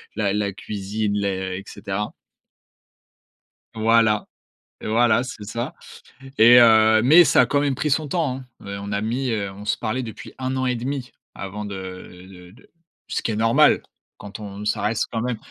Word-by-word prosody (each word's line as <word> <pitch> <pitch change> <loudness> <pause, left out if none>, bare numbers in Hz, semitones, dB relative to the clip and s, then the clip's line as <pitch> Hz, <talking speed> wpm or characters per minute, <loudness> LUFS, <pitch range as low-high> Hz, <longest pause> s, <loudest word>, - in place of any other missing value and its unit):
la 100 -2 0
la 105 -1 -1
cuisine, 105 +1 -3
les 95 -2 -2
et 100 - -8
cetera. 105 0 -5 1.6
Voilà, 110 -1 +3 0.6
voilà, 115 +1 +2
c'est 120 -4 -8
ça 115 +3 -4 0.6
et 120 +2 +8
heu, 110 -1 +6
mais, 155 +8 +8
ça 150 - +4
a - - +4
quand 145 - +1
même 140 -2 0
pris 150 - -1
son 155 +2 +1
temps, 145 -4 -1
hein. 130 - -11 0.2
Heu, 100 0 -6
on 100 +1 -6
a 100 0 -1
mis, 125 +5 -2
heu, 100 -3 -2
on 100 +2 -11
se - - 0
parlait 125 +4 -2
depuis 110 -2 -9
1 130 0 -2
an 130 - -1
et 125 -1 0
1/2 130 +2 -4 0.2
avant 105 +2 -6
de 95 -2 -8
de 90 -2 -14
de 115 - -21 0.4
ce - - -2
qui - - -2
est - - -2
normal. 115 +8 +4 0.3
Quand 100 0 -10
on 105 0 -8
ça 105 - -1
reste 110 +1 0
quand 115 - -2
même 125 -1 -2
110 Hz, 185 wpm, -22 LUFS, 100-125 Hz, 1.6 s, et